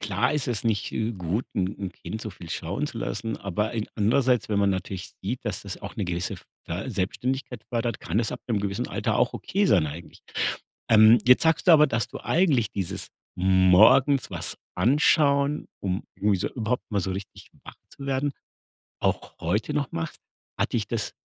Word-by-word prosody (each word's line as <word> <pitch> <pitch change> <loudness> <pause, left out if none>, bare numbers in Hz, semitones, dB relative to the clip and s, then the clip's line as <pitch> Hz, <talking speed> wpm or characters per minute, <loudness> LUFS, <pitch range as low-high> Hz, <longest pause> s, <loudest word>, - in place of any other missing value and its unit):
klar 100 +4 0
ist 150 -4 -1
es 120 -2 -2
nicht, 110 -2 0
äh, 110 +1 -1
gut, 95 +4 -2
'n 95 -1 +1
'n 95 -2 -4
Kind 110 - -7
so 110 - -5
viel 90 -3 -11
schauen - - -2
zu - - -7
lassen, 110 +2 -3
aber 100 +2 -2
in 110 -2 -2
andererseits, 120 +2 +2
wenn 105 - +2
man 100 0 +3
natürlich 95 0 -4
sieht, 120 +7 -3
dass 105 -3 -2
das 100 -3 -7
auch - - -7
'ne 105 - -1
gewisse 85 0 -2
f - - -13 0.2
äh, - - -4
Selbstständigkeit 125 +4 -3
fördert, 115 -2 -1
kann 90 +6 -1
das 115 -2 0
ab - - -6
'nem 110 -4 +1
gewissen 100 0 -2
Alter - - -1
auch - - +2
okay 200 +2 0
sein 85 - +4
eigentlich. 80 +4 -9 0.7
Ähm, 110 +1 +8
jetzt 125 0 +7
sagst 160 0 +2
du - - +10
aber, 150 -1 +7
dass 120 -4 -1
du - - -7
eigentlich 145 - +2
dieses 95 -4 -3 0.3
morgens 95 +9 +5
was - - -5 0.2
anschauen, 140 - +3 0.2
um 95 -1 -1
irgendwie 100 -1 +2
so - - -1
überhaupt 120 +1 -2
mal 100 -2 +1
so 95 - -2
richtig 95 +1 -8 0.2
wach - - -10 0.2
zu 140 - -10
werden, 135 +1 0 0.7
auch - - -1
heute 105 - -1
noch 145 -3 -1
machst, 85 0 -4 0.4
hat - - 0
dich - - 0
das - - -2
110 Hz, 195 wpm, -26 LUFS, 95-125 Hz, 0.7 s, du